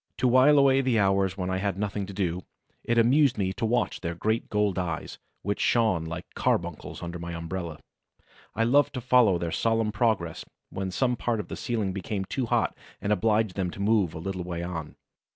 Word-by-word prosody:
To 130 - +2
while 130 +4 +6
away 135 -1 +5
the 130 -3 +1
hours 95 -2 +2
when 90 -1 -2
I 95 - 0
had 95 0 -1
nothing 100 -1 -2
to - - -7
do, 90 -2 -1 0.4
it 120 - 0
amused 130 +4 +4
me 95 -2 0
to 115 - -2
watch 120 0 0
their 85 -1 -3
great 110 +6 -1
gold 105 -3 +1
eyes, 85 -3 -4 0.2
which 100 +2 -2
shone 110 -9 +2
like 85 +2 -5
carbuncles - - -2
under 85 0 -5
my 85 0 -5
umbrella; 85 -1 -5 0.8
I 115 - +2
loved 140 +5 +3
to - - -1
follow 120 -6 +4
their 85 -1 -3
solemn 115 +1 +1
progress 105 -7 0 0.3
when 95 0 -3
some 125 +6 +1
part 120 -1 -1
of 100 - -6
the - - -4
ceiling 110 -6 -2
became 95 +1 -3
too 125 +4 -2
hot - - +1 0.2
and 105 +1 +1
obliged 105 0 +1
them 95 -3 -1
to 95 - -9
move 100 -4 +2
a - - -4
little 90 +2 -4
way 85 -1 -4
on. 85 -4 -5
100 Hz, 205 wpm, -27 LUFS, 90-115 Hz, 0.8 s, while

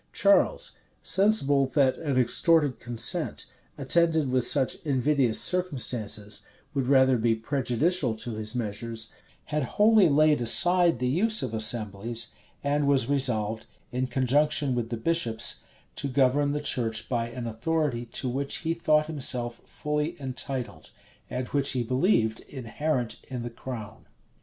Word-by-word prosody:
Charles, 200 0 +3 0.3
sensible 145 -10 +2
that 135 -3 +3
an 145 -5 -2
extorted 145 +2 +2
consent, 120 -1 -3 0.3
attended 160 +1 +2
with 125 -1 +1
such 135 -3 0
invidious 135 -4 +1
circumstances, 125 - -1 0.3
would 135 -3 -1
rather 130 -2 +4
be 115 0 +2
prejudicial 130 +3 0
to 120 +2 -5
his 110 +2 -6
measures, 115 0 -4 0.4
had 150 - +1 0.2
wholly 210 -4 +5
laid 150 -1 +3
aside 175 +7 +5
the 125 +1 -1
use 205 - +1
of 125 -4 -4
assemblies, 110 +1 0 0.3
and 145 0 0
was 135 -4 +2
resolved, 115 -6 0 0.2
in 130 +1 -1
conjunction 135 +2 +1
with 120 -2 -2
the 120 - -3
bishops, 115 -4 0 0.4
to 140 - -2
govern 140 +2 +2
the 150 0 -2
church 115 -6 -1
by 115 -2 -2
an 120 0 -6
authority 120 +1 -2
to 130 - -3
which 135 +3 -1
he 165 - +1
thought 155 -2 +2
himself 125 -6 -2
fully 150 +3 -3
entitled, 130 - -3 0.4
and 125 0 -4
which 140 -1 0
he 125 -2 -1
believed 120 - +1
inherent 130 0 -3
in 125 -3 -5
the 120 - -6
crown. 115 -3 -8
130 Hz, 140 wpm, -27 LUFS, 115-150 Hz, 0.4 s, wholly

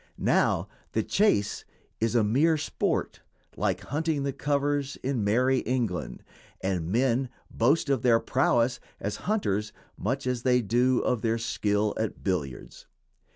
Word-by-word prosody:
Now - - +2 0.3
the - - +1
"chase" 105 - +1 0.4
is 115 +1 0
a 115 - +4
mere 145 +10 +3
sport, 150 - -2 0.3
like - - -1
"hunting 150 0 -1
the 140 -1 -1
covers" 145 0 0
in 130 -4 -1
Merrie 125 +6 +3
England, 105 - -2 0.4
and 90 -3 -2
men 125 +2 +1 0.2
boast 140 +8 +2
of 135 -3 +1
their 120 -3 +4
prowess 125 -1 +1 0.2
as 105 - -3
hunters 105 - 0 0.3
much 130 +7 -2
as 125 -2 -1
they 125 -1 +3
do 120 +4 +2
of 125 -3 0
their 115 0 +1
skill 105 -2 0
at 110 -1 -3
billiards. 75 -10 -4
125 Hz, 140 wpm, -27 LUFS, 105-135 Hz, 0.4 s, a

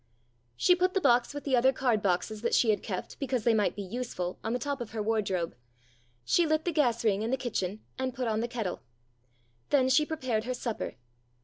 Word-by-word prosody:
She 360 - +5
put 365 +1 +1
the - - +4
box 240 -8 +3
with 290 0 -6
the 270 -3 +2
other 255 +2 +5
card 245 -5 +1
boxes 200 +3 0
that 235 - +1
she 225 - +4
had 205 - 0
kept 185 -4 -5
because 260 -5 -1
they 235 - +4
might 210 -2 +1
be 205 - -4
useful 190 -4 -4
on 225 - -2
the 245 - +1
top 280 +1 -3
of 230 -2 -6
her 215 -2 -2
wardrobe; 195 -6 -1 0.7
she 340 - +3
lit 310 0 +1
the 350 - +1
gas 245 -7 +1
ring 205 -2 +2
in 225 - -1
the 265 - +1
kitchen, 215 -5 -3 0.2
and 260 0 -1
put 250 -2 -2
on 220 -1 0
the 235 - -1
kettle. 225 - -4 0.9
Then 260 -3 +3
she 305 +3 +5
prepared 255 -8 -1
her 255 0 -2
supper. 235 -2 -4
240 Hz, 220 wpm, -29 LUFS, 215-265 Hz, 0.9 s, She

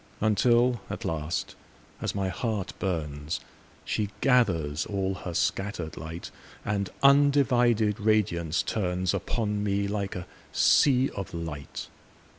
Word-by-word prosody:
Until 120 +2 +3
at - - -5
last, 80 +1 -2 0.5
as - - -2
my 95 -1 0
heart 105 +1 -2
burns, 75 -5 -2 0.5
She 105 -2 -1
gathers 90 - +2
all 95 -1 -1
her 90 -2 -6
scatter'd 95 -5 -1
light, 80 +3 -7 0.3
And 100 -1 -1
undivided 125 -6 +4
radiance 90 -7 +1
turnsUpon 100 +2 -1
me 100 -1 0
like 100 -1 -2
a 90 -1 -5 0.3
sea 130 -2 +4
of 100 -4 -6
light. 80 -4 -6
100 Hz, 110 wpm, -27 LUFS, 85-110 Hz, 0.5 s, undivided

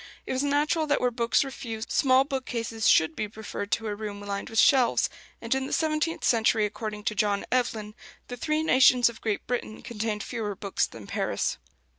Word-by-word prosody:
It - - -3
was 260 - 0
natural 295 +2 +1
that 290 - +2
where 250 - +1
books 235 +1 +2
were 270 - -6
few, 225 -4 -6
small 260 -1 +4
bookcases 235 -5 -3
should 160 0 +4
be 215 - -2
preferred 205 -1 -7
to 225 - -1
a 210 - -2
room 205 -1 -6
lined 200 0 -5
with 225 - -6
shelves; 255 -2 +4 0.3
and 230 +1 -1
in 265 0 -1
the - - -5
seventeenth 315 0 0
century, 220 -2 +3
according 210 0 -5
to 215 - 0
John 205 -1 0
Evelyn, 225 -4 -1 0.3
the 245 - -6
"three 305 +5 -1
nations 255 -4 +5
of 230 - -12
Great 215 -2 -2
Britain" 235 -3 -4
contained 215 -2 -3
fewer 215 -4 -4
books 200 0 -1
than 110 -3 -11
Paris. - - -2
230 Hz, 195 wpm, -27 LUFS, 210-260 Hz, 0.3 s, nations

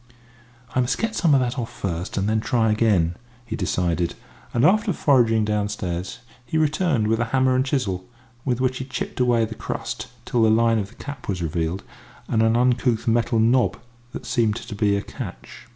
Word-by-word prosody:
"I - - +1
must 125 -1 +1
get 225 0 -2
some 160 -5 +4
of 135 - +4
that 125 +1 -1
off 115 - -4
first, 90 0 -4
and 100 +1 +1
then 110 +1 +2
try 110 0 +1
again," 100 -7 +2 0.3
he 115 -2 -4
decided; 90 -3 -1 0.4
and 120 - +2
after 210 0 +3
foraging 115 -8 +3
downstairs, 105 -1 -2 0.2
he 120 +6 -2
returned 155 - +2
with 115 +1 +1
a 120 - +1
hammer 130 +2 +2
and 130 - +3
chisel, 100 -9 -2 0.3
with 125 -2 0
which 130 0 0
he 130 - -4
chipped 130 - -5
away 120 -2 +3
the 110 - -6
crust - - -5 0.2
till 120 - +1
the 110 - +5
line 115 0 +4
of 100 -1 -4
the - - -18
cap 145 -5 -8
was 90 -3 -1
revealed, 85 +3 -2 0.4
and 110 - +1
an 110 0 +3
uncouth 120 -1 +2
metal 115 0 +2
knob 120 +3 +3 0.3
that - - -7
seemed 110 -3 +1
to 115 -1 -7
be 100 -1 +2
a 100 - -3
catch. - - -9
115 Hz, 195 wpm, -23 LUFS, 105-125 Hz, 0.4 s, the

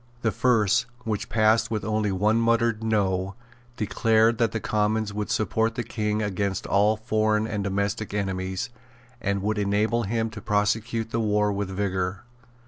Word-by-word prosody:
The 110 - +2
first, 110 -3 +2 0.2
which 110 -3 -3
passed 110 +1 +3
with 110 -2 -2
only 105 -1 0
one 105 +4 +2
muttered 115 -1 +2
No, 100 -3 0 0.4
declared 110 +1 +2
that 115 -2 +2
the 115 - -2
Commons 105 0 0
would 105 0 -3
support 110 +1 0
the 120 - -2
King 105 -1 -2
against 100 -1 -2
all 105 +2 +3
foreign 110 -1 +1
and 105 -2 -3
domestic 100 +2 -2
enemies, 95 0 -3 0.5
and 100 -1 -1
would 105 +1 0
enable 105 +3 +1
him 115 +1 -1
to 105 -1 -8
prosecute 110 +2 0
the 115 - 0
war 105 -1 +2
with 100 -1 -2
vigour. 95 0 -2
105 Hz, 155 wpm, -25 LUFS, 100-110 Hz, 0.5 s, passed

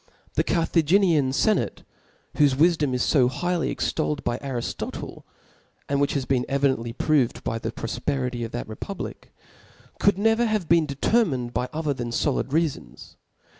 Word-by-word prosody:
The - - +2
Car* 165 -2 +1
thaginian 165 -3 +3
lenate, 210 +11 0 0.5
Wbofe 145 -3 +4
wifijom 150 -3 +3
is 125 - +1
fo 130 -5 +5
highly 175 +6 -1
extol 155 -1 -1
led 140 - -12
by 120 - -1
Ariftotle 130 -4 -5 0.7
(and 140 0 0
which 145 - +1
has 135 -2 -1
been 125 -2 +1
evidently, 135 -4 +1
proved 135 0 +1
by 115 - -2
the - - -4
profperity 125 0 -3
of 115 - -5
that 120 - -5
republic) 180 - -7 0.7
could 200 -2 +3
never 225 +3 +3
have 215 -6 -1
been 165 -1 +4
determined 140 - +1
by 125 +2 -1
other 155 -2 -1
than 120 -3 -4
foljd 135 +4 0
reafons. 155 +2 -3
140 Hz, 155 wpm, -25 LUFS, 125-170 Hz, 0.7 s, fo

